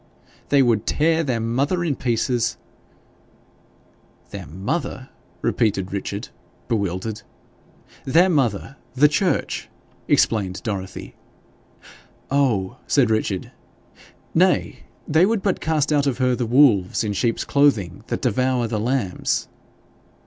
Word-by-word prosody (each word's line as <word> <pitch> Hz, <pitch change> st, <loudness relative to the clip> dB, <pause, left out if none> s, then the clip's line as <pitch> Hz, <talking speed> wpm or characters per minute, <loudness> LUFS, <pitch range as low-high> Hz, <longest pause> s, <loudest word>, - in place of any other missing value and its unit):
'They 140 Hz, -1 st, +5 dB
would 115 Hz, -3 st, +1 dB
tear 160 Hz, +2 st, +2 dB
their 125 Hz, -6 st, -1 dB
mother 135 Hz, +10 st, 0 dB
in 155 Hz, -5 st, 0 dB
pieces 120 Hz, -1 st, 0 dB, 0.8 s
' -, -, -34 dB
'Their -, -, -7 dB
mother!' 130 Hz, -, -4 dB, 0.3 s
repeated 100 Hz, -5 st, 0 dB
Richard, 100 Hz, +5 st, -4 dB, 0.4 s
bewildered. 105 Hz, 0 st, -2 dB, 0.8 s
'Their 165 Hz, +7 st, +4 dB
mother, 135 Hz, -, 0 dB, 0.2 s
the 145 Hz, +3 st, +6 dB
church,' 165 Hz, +1 st, -1 dB, 0.4 s
explained 100 Hz, -4 st, +1 dB
Dorothy. 100 Hz, -5 st, -5 dB, 1.2 s
'Oh!' 120 Hz, -10 st, +1 dB
said 125 Hz, -6 st, +3 dB
Richard. 105 Hz, -4 st, -1 dB, 0.8 s
'Nay, -, -, +2 dB, 0.3 s
they 160 Hz, +5 st, +4 dB
would 220 Hz, -2 st, 0 dB
but 195 Hz, -, 0 dB
cast 155 Hz, -1 st, +1 dB
out 145 Hz, -1 st, +2 dB
of 130 Hz, -4 st, 0 dB
her 125 Hz, -1 st, +2 dB
the 120 Hz, -2 st, -2 dB
wolves 115 Hz, -7 st, +4 dB
in 105 Hz, -1 st, -2 dB
sheep's 115 Hz, +3 st, 0 dB
clothing 110 Hz, -, +1 dB
that -, -, -3 dB
devour 125 Hz, 0 st, +1 dB
the 110 Hz, -2 st, -2 dB
lambs.' 115 Hz, -4 st, -1 dB
125 Hz, 115 wpm, -22 LUFS, 105-145 Hz, 1.2 s, the